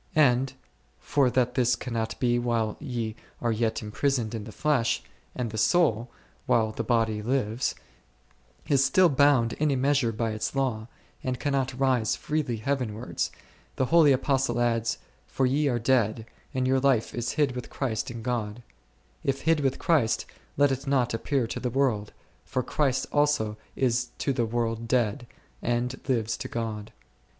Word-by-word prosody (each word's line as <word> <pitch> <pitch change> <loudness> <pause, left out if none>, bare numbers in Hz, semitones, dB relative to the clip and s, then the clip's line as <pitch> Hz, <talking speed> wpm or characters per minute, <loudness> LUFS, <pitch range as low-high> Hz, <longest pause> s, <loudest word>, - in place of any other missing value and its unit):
And, 130 -2 +4 0.5
for 140 -3 +2
that 125 0 +1
this 125 -1 +2
cannot 115 -2 -4
be 120 -1 +2
while 115 -3 0
ye 120 -7 -3 0.2
are 120 - 0
yet 115 0 -1
imprisoned 120 +1 -1
in 110 -3 -4
the 110 - -8
flesh, 115 -4 +1 0.3
and 120 -3 -3
the 110 - -3
soul, 120 - +3 0.4
while 110 -2 +3
the 115 - -4
body 110 -2 +1
lives, 120 0 -1 0.9
is 140 -2 +3
still 175 +7 +5
bound 140 -4 +4
in 155 0 0
a 140 - +2
measure 135 -2 +2
by 115 0 -2
its 110 +5 -3
law, 120 -5 -1 0.4
and 130 -1 -2
cannot 135 -3 -1
rise 130 -5 +2
freely 150 -6 -2
heavenwards, 120 -2 -2 0.4
the 130 - +1
holy 160 -4 +7
Apostle 135 -1 +1
adds, 115 -1 +1 0.3
For 135 - 0
ye 140 +4 +2
are 125 -3 +1
dead, 115 -2 +1 0.3
and 130 -2 0
your 130 0 +3
life 130 -4 +2
is 120 0 -2
hid 145 -3 +2
with 125 -1 -6
Christ 120 -6 -2
in 115 -2 -7
God: 120 -2 -3 0.6
if 135 0 -1
hid 165 -1 +3
with 135 -2 0
Christ, 145 -10 +2 0.3
let 145 0 +4
it 135 +1 -3
not 130 -4 +2
ap 115 - -4
pear 135 -5 +1
to 115 - -4
the 125 - -2
world, 120 -5 0 0.3
for 130 -1 -2
Christ 135 0 0
also 145 -8 +2 0.2
is 125 -1 +1
to 140 - 0
the 120 -3 0
world 115 0 -2
dead, 120 +1 0 0.3
and 120 +2 -1
lives 115 -3 0
to - - -5
God. 110 -3 -4
125 Hz, 165 wpm, -27 LUFS, 115-135 Hz, 0.9 s, holy